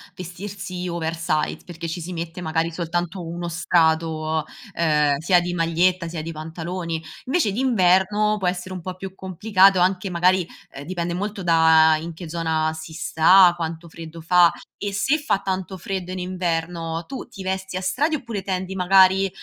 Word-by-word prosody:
vestirsi 180 0 -6
oversize, 165 -2 -1
perché 170 -2 -7
ci 165 - -4
si 175 +2 -6
mette 165 0 -6
magari 165 0 -1
soltanto 175 +2 -3
1 170 +1 -4
strato, 160 -2 +1 0.3
ehm, 150 -4 +2
sia 175 +4 +3
di 175 0 -3
maglietta, 170 +1 +1
sia 165 -1 -5
di 165 +2 -5
pantaloni; 165 +1 -5 0.2
invece 265 - +1
d'inverno, 210 -2 +2
può 190 - -1
essere 180 +1 -3
un 185 - -5
po' 180 +2 -6
più 190 0 -8
complicato, 190 +1 +3
anche 185 +1 +1
magari, 180 0 +2 0.2
ehm, 140 - -9
dipende 170 0 -3
molto 200 +2 -4
da 160 -2 +5
in 165 +2 -6
che 165 0 -9
zona 160 -1 0
si 160 0 -9
sta, 175 +3 +5
quanto 165 0 -5
freddo 165 0 -10
fa; 175 +1 +5 0.3
e 205 -1 -4
se 270 +10 +2
fa 285 -9 0
tanto 190 -1 -4
freddo 185 0 -5
in 185 - -4
inverno, 170 -2 -3
tu 265 - -7
ti 205 -5 -10
vesti 190 0 -3
a 185 - -2
strati, 290 - 0
oppure 230 -8 -5
tendi, 190 0 -3
magari, 190 +1 +4
175 Hz, 165 wpm, -22 LUFS, 165-190 Hz, 0.3 s, da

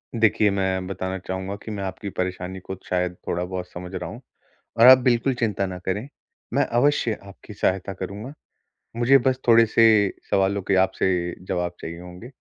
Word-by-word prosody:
देखिए 110 -2 +3
मैं 95 -1 -1
बताना 95 0 -4
चाहूँगा 95 +1 -5
कि 110 - -6
मैं 100 -2 -4
आपकी 95 +1 -5
परेशानी 90 0 -4
को 95 +1 -7
शायद 90 -1 -1
थोड़ा 90 +1 -1
बहुत 90 0 -5
समझ 90 +1 -8
रहा 90 -2 -4
हूँ। 120 +8 -9 0.6
और 115 - +8
आप 130 0 +11
बिल्कुल 125 +1 +2
चिंता 105 -5 -1
ना 95 -1 -5
करें, 105 +7 -2 0.5
मैं - - +3
अवश्य 120 -3 +1
आपकी 100 +2 -12
सहायता 95 0 -1
करूँगा। 100 +8 -7 0.6
मुझे 125 +3 +5
बस 130 -1 +2
थोड़े-से 115 0 +6 0.4
सवालों 100 +1 +1
के 100 - +3
आपसे 90 -2 -1
जवाब 90 -2 -1
चाहिए 85 +1 -7
होंगे। 90 +7 -11
95 Hz, 170 wpm, -23 LUFS, 90-115 Hz, 0.6 s, आप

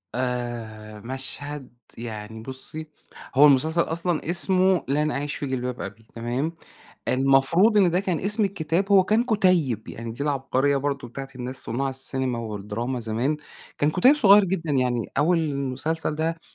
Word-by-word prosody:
آآ 120 -4 -4
مشهد 135 +2 -4 0.3
يعني 110 -1 -7
بُصّي، 135 +5 -8 0.5
هو 140 +3 +8
المسلسل 155 +5 +3
أصلًا 170 0 -1
اسمه 185 +1 +3
لن 150 +3 +1
أعيش 145 +1 -3
في - - -4
جلباب 125 -1 -3
أبي 100 +3 -8
تمام؟ 125 +7 -2 0.6
المفروض 135 - +4
إن 190 -4 +5
ده 180 +2 +1
كان 185 -4 -1
اسم 210 +2 +1
الكتاب 190 0 -1
هو 190 -2 +6
كان 215 +5 +2
كُتيّب. 185 - +1
يعني 115 0 -6
دي 120 - -5
العبقرية 140 -1 +1
برضه 140 -2 -2
بتاعة 135 +3 -7
الناس 125 +1 -5
صُناع 135 +4 -2
السينما 130 -2 -3
والدراما 110 +3 -4
زمان. 115 +6 -1 0.4
كان 145 - +2
كُتيِّب 220 - +5
صغير 205 -7 +6
جدًا 175 -4 -2
يعني 125 -4 0
أول 165 +4 +3
المسلسل 150 +1 -2
ده 165 +1 -2
140 Hz, 150 wpm, -24 LUFS, 125-170 Hz, 0.6 s, هو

